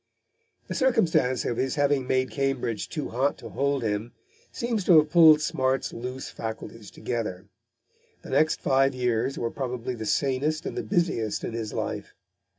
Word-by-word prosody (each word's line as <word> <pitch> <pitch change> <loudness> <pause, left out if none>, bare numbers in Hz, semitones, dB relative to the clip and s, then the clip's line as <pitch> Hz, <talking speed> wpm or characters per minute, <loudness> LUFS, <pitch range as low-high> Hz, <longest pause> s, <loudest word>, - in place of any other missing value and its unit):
The - - -4
circumstance 180 - +2
of 120 - -1
his 130 +1 0
having 145 -3 +1
made 130 0 +1
Cambridge 135 -5 -2
too 150 -3 -4
hot 135 +4 0
to - - -9
hold 140 -2 0
him 110 +2 -2 0.4
seems 235 -4 -2
to 175 - +7
have 150 -1 +4
pulled 160 -3 +7
Smart's 135 -4 0
loose 125 +3 -6
faculties 110 -1 -7
together. 105 -6 -4 0.8
The - - -9
next 155 +4 +2
five 135 0 +2
years 125 +1 0
were 115 - -2
probably 125 -2 -4
the 110 -3 -6
sanest 140 +5 0
and - - -4
the - - -1
busiest 170 - -1
in - - -4
his 115 -2 -4
life. - - -4
130 Hz, 160 wpm, -26 LUFS, 120-150 Hz, 0.8 s, to